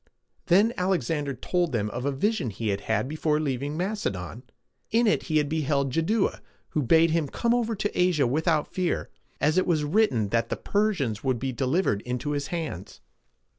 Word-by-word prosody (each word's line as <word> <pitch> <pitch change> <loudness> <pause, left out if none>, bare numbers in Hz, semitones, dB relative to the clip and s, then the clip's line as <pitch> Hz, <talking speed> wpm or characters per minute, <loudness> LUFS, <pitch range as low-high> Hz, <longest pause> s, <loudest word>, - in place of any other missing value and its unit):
Then 205 +7 +4
Alexander 155 -6 0
told 175 +2 -1
them 105 -2 -1
of 120 +4 -4
a 140 - +1
vision 205 - 0
he 110 +2 -3
had 100 0 -1
had 110 +3 0
before 155 +1 0
leaving 145 0 -2
Macedon. 125 - -3 0.5
In 235 +2 +3
it 210 - +3
he 155 - +2
had 150 -1 +2
beheld 140 -3 0
Jaddua, 195 - 0 0.3
who 155 - 0
bade 160 +5 +4
him 160 -2 +1
come 235 - 0
over 230 -2 0
to 205 0 -3
Asia 175 -6 +3
without 155 +4 0
fear, 185 -2 -1 0.3
as 155 +5 +3
it 185 - 0
was 160 -4 +2
written 145 - +2
that 115 +1 0
the - - -2
Persians 185 - 0
would 130 -2 +1
be 130 +2 -2
delivered 130 - 0
into 125 +5 -3
his 145 0 -2
hands. 160 - -5
150 Hz, 180 wpm, -26 LUFS, 125-180 Hz, 0.5 s, Then